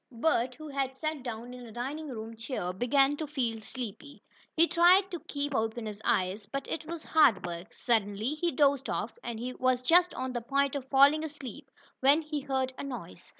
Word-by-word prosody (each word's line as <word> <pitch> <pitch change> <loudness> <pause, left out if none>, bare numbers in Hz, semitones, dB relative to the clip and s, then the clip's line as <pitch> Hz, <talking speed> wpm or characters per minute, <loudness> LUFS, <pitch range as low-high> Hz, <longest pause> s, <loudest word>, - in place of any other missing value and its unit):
Bert, 250 -1 +1
who 310 +2 -9
had 270 -2 -2
sat 310 -1 -3
down 240 0 -6
in 250 0 -9
a - - -11
dining 280 +7 -4
room 225 -2 -6
chair, 225 -6 -4
began 270 +7 +3
to 310 - -4
feel 240 -6 -2
sleepy. 250 +5 -8 0.3
He 335 +1 +6
tried 365 +4 +5
to 350 - -4
keep 285 0 -4
open 225 -1 -1
his 210 -1 -6
eyes, 190 +3 0
but 275 +5 -4
it 315 - -4
was 335 -1 -5
hard 245 -13 +4
work. 170 0 -6
Suddenly 220 +1 0
he 340 +3 0
dozed 280 0 +2
off, - - -2
and 235 -2 -4
he 250 +3 -4
was 255 0 +1
just 350 +6 +4
on 255 0 -3
the 240 - -2
point 275 +3 +1
of 265 -2 -5
falling 285 +3 +6
asleep, 285 -2 -8 0.3
when 285 +4 +5
he 300 -1 -3
heard 265 -2 -1
a - - -4
noise. 215 -11 -8
260 Hz, 200 wpm, -30 LUFS, 230-295 Hz, 0.3 s, He